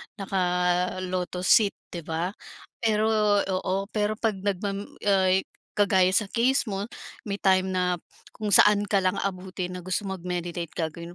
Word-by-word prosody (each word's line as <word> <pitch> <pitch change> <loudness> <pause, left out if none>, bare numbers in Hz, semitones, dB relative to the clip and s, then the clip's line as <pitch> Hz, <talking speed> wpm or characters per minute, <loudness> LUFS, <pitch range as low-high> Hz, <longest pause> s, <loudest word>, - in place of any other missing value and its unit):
naka-lotus 180 -1 -1
sit, 210 -3 +5 0.2
'di 175 - -5
ba? 165 +3 -2 0.5
Pero 220 -1 +2 0.3
oo, 190 +1 -2
pero 210 0 0
'pag 215 -3 -1
nagma 200 0 -1 0.3
ay, 190 -2 +3 0.3
kagaya 190 -3 +3
sa 210 - +3
case 255 +3 +2
mo 200 +1 -3 0.4
may 200 - -1
time 190 -1 +3
na 180 -1 0 0.4
kung 210 -1 -3
saan 205 0 +6
ka 200 - +2
lang 185 +1 +1
abutin 185 -1 -4
na 180 - -5
gusto 185 +3 -1
mag-meditate 175 -2 -4
gagawin 170 +1 -4
190 Hz, 140 wpm, -26 LUFS, 180-205 Hz, 0.5 s, saan